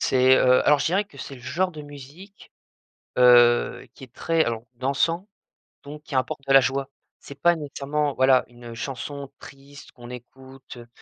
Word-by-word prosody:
C'est, 130 0 +4
heu, 125 0 +3
alors 150 -1 +5
je 135 - -1
dirais 190 +5 +1
que 200 - -18
c'est 140 - -8
le 125 - -14
genre 170 +10 -2
de 155 -3 -10
musique, 145 +8 -14 0.7
heu, 120 -1 +4
qui - - -15
est 120 -2 -14
très 165 -1 0
alors 115 -1 -3
dansant, 155 - -1 0.6
donc 150 +1 -11
qui 150 - -8
apporte 130 +1 -2
de 135 - +2
la 135 - +8
joie. 135 +1 -2 0.3
C'est 140 - -12
pas 175 +2 +3
nécessairement 145 -1 -3
voilà, 130 0 +4
une 120 -1 -12
chanson 135 +3 -7
triste 140 +1 -14
qu'on 120 -4 -13
écoute, 130 +1 -13
heu 120 - -12
135 Hz, 180 wpm, -23 LUFS, 125-150 Hz, 0.7 s, la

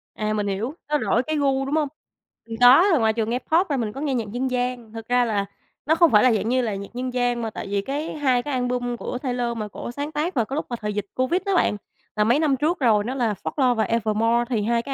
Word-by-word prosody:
À, 215 0 -2
mình 210 -1 -1
hiểu. 210 +8 -2 0.2
Nó 300 - +2
đổi 245 -3 +1
cái 310 +2 -2
gu, 270 -1 +1
đúng 280 +3 -1
hông? 305 -2 +1 0.6
Mình 225 -1 -6
có, 255 +8 +8
rồi 325 - +4
ngoài 220 -1 +2
trường 220 -1 -1
nghe 245 +2 0
Pop 335 +6 +1
ra 285 - 0
mình 220 -4 -2
có 275 - -7
nghe 290 -3 -1
nhạc 225 -4 -2
dân 255 +3 -2
gian. 245 -3 -3
Thực 225 -1 -8
ra 245 0 +3
là 205 -3 0 0.4
nó 315 - +3
không 335 -1 +5
phải 210 -1 +6
là 255 -2 +5
dạng 220 +1 -1
như 255 +1 +2
là 220 -4 -2
nhạc 200 0 -7
dân 250 +1 -4
gian 245 -1 0
mà 225 - -2
tại 215 - -7
vì 200 0 -1
cái 285 +8 -4
2 260 -5 +1
cái 290 - -4
album 245 -1 -1
của 250 - -4
Taylor 245 -3 -2
mà 215 -1 -3
cổ 210 - -7
sáng 285 +4 -5
tác 310 +4 -2
vào 235 -4 +2
cái 270 - -5
lúc 310 - -2
mà 240 - -2
thời 210 0 -2
dịch 205 -1 -3
Covid 260 +9 +1
đó 395 -1 +1
bạn, 210 - +2 0.4
là 210 - +2
mấy 235 +7 +3
năm 300 -4 +2
trước 310 +6 0
rồi, 220 -5 +3
nó 255 +5 -4
là 230 -5 0
"Folklore" 260 -4 +1
và 220 - +1
"Evermore". 230 +2 +1
Thì 225 -5 0
2 235 +2 +1
cái 275 +3 -5
245 Hz, 285 wpm, -23 LUFS, 225-275 Hz, 0.6 s, có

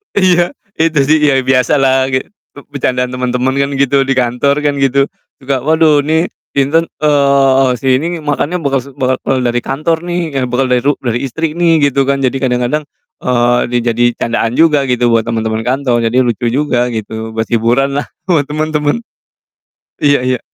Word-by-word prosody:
Iya 180 +3 +2 0.2
itu 160 -2 +2
sih, 155 +1 +4
ya 140 - +3
biasa 130 0 +2
lah 135 -1 +2
gi 130 - 0 0.3
be 145 - -11 0.2
becandaan 125 -1 -1
temen-temen 125 +1 -1
kan 140 - +1
gitu 135 0 +2
di 135 - +1
kantor 125 +3 +1
kan 145 -1 +1
gitu, 135 0 +2 0.4
suka, 135 -1 -1
"Waduh 155 +1 +3
nih 160 +2 +1 0.2
sinten 150 +5 +2 0.2
eee, 140 -2 +3
si 130 +1 +2
ini 165 0 -4
makannya 150 +4 -2
bakas 135 -1 -2
bekal 130 0 -1
bekal 130 -1 -1
dari 120 0 0
kantor 155 +6 -1
nih, 175 0 -1 0.3
bekal 125 +2 0
dari 125 -1 +3
ru 145 0 +2
dari 120 -1 -1
istri 160 +4 -3
nih," 165 -2 +2
gitu 135 0 0
kan, 140 0 0
jadi 130 0 +1
kadang-kadang, 125 +3 0 0.4
eee, 120 -1 +2
dijadiin 120 0 +1
candaan 115 0 -1
juga 150 -4 +3
gitu 120 -1 +1
buat 115 0 +1
temen-temen 110 -1 -2
kantor, 130 -2 +1
jadi 120 +3 -1
lucu 120 -1 -1
juga 125 -1 0
gitu, 110 +1 -6
buat 110 -1 -2
hiburan 120 +4 +1
lah. - - -6 0.2
Buat 160 -7 +1
temen-temen. 150 -1 -1 1.1
Iya 145 -1 +4
iya, 125 -2 0
135 Hz, 170 wpm, -13 LUFS, 125-145 Hz, 1.1 s, sih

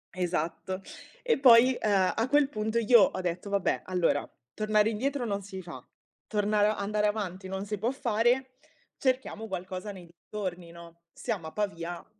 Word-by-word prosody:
Esatto. 180 +1 -2 0.4
E 470 - +2
poi, 250 0 +7
ehm, 195 -3 +2
a 225 +2 0
quel 290 -1 +4
punto 220 -2 -2
io 230 -1 +6
ho 185 - +2
detto: 180 +3 -3
"Vabbè, 200 -2 0
allora 180 -2 0 0.2
tornare 215 0 +2
indietro 260 +3 -1
non 200 -2 -2
si 190 -1 -8
fa, 145 -8 -9 0.4
tornar 210 0 +2
andare 210 +1 0
avanti 195 -3 -3
non 190 +1 -4
si 210 -1 -4
può 225 - +1
fare, 255 0 0 0.4
cerchiamo 255 -4 -1
qualcosa 185 +2 -5
nei 185 -3 -11
dintorni, 175 0 -6
no, 170 0 -14
siamo 170 -4 -4
a - - -8
Pavia, 175 -4 -4
205 Hz, 155 wpm, -29 LUFS, 185-225 Hz, 0.4 s, poi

